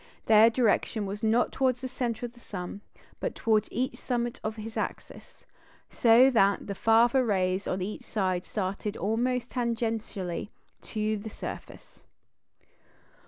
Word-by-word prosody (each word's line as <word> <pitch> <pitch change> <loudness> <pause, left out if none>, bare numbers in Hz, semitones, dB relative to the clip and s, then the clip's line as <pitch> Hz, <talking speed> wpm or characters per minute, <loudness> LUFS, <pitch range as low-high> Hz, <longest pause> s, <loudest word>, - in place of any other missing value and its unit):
Their 220 +1 +7
direction 225 -2 +1
was 200 +2 -5
not 225 +2 +2
towards 255 -2 +1
the 260 - -3
centre 245 -2 -3
of 240 - -8
the 240 - -18
sun, 195 -2 -7 0.4
but - - -3
towards 215 -2 +1
each 255 +3 -2
summit 240 -2 -2
of 215 0 -3
his 220 0 -8
axis, - - -6 0.5
so 240 +3 +6
that 200 -4 +3
the 200 - -4
farther 230 +5 +4
rays 190 -3 0
on 185 0 -1
either 210 +3 -5
side 185 -4 -1
started 200 +1 -3
almost 240 +3 -1
tangentially 225 -6 -2 0.3
to 215 0 -2
the 215 +2 -7
surface. - - -9
220 Hz, 140 wpm, -28 LUFS, 205-240 Hz, 0.5 s, Their